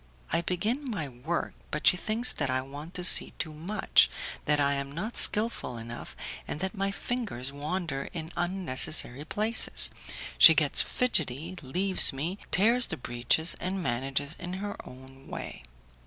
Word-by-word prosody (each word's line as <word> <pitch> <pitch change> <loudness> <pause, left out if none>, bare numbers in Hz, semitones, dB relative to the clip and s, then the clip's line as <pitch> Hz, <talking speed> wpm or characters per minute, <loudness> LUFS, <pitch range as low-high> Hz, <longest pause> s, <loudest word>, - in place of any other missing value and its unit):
I 165 - +3
begin 220 - -2
my 185 -10 -3
work, 135 +7 -4 0.2
but 150 - -4
she - - +7
thinks 220 +6 +1
that 145 -3 -2
I 130 0 0
want 145 +6 -10
to 180 - -2
see 175 - +6
too 155 - -4
much, 185 +7 +3 0.4
that 150 0 +2
I 140 0 +2
am 140 0 -4
not 210 +9 -5
skilful 210 - +2
enough, 115 +1 -8 0.3
and - - -5
that 190 +2 -2
my 195 -1 -1
fingers 200 - -4
wander 150 -1 -4
in 160 -1 -5
unnecessary 160 -6 +1
places; 215 +7 +3 0.5
she - - +10
gets - - +3
fidgety, 165 - -1
leaves 185 +8 +3
me, 160 +8 -4
tears 235 +6 +4
the 160 - -4
breeches, 125 +7 0
and 185 +1 -3
manages 135 +4 -2
in 175 +1 -6
her 205 +2 -5
own 130 +1 -14
way. - - -7
165 Hz, 155 wpm, -28 LUFS, 140-195 Hz, 0.5 s, she